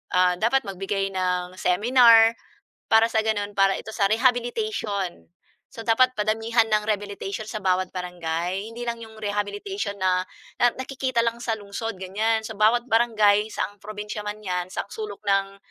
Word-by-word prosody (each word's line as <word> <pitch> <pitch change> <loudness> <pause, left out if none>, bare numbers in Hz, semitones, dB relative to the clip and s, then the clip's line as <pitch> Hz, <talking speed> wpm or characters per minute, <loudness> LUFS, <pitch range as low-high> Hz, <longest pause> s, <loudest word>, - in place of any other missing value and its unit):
ah, 180 0 +4
dapat 255 +6 +2
magbigay 195 +1 -2
ng 180 -1 -2
seminar 230 +3 +5 0.5
para 225 +1 +6
sa 220 -1 +1
ganun, 205 -2 -1
para 195 0 +4
ito - - -9
sa 200 - +2
rehabilitation. 240 - 0 0.5
So 230 - -7
dapat 255 +3 +4
padamihan 225 +2 +1
ng 215 -1 +2
rehabilitation 205 0 -3
sa 215 - -4
bawat 185 0 +1
barangay. 180 +2 -3
Hindi 240 +1 -6
lang 235 -1 -3
'yong 220 -1 -11
rehabilitation 205 - -3
na 185 -1 +2 0.4
na 245 - +6
nakikita 260 -2 -1
lang 230 0 -1
sa 230 -2 -1
lungsod 205 +1 -5
ganiyan. 215 +4 -1
So 220 - -6
bawat 225 +3 +3
barangay, 215 -3 +3
saang 205 -1 -4
probinsiya 210 0 -6
man 210 +1 -6
‘yan, 180 -2 -2
saang 200 +1 -5
sulok 210 -2 -7
ng 195 0 +1
210 Hz, 155 wpm, -24 LUFS, 195-230 Hz, 0.5 s, para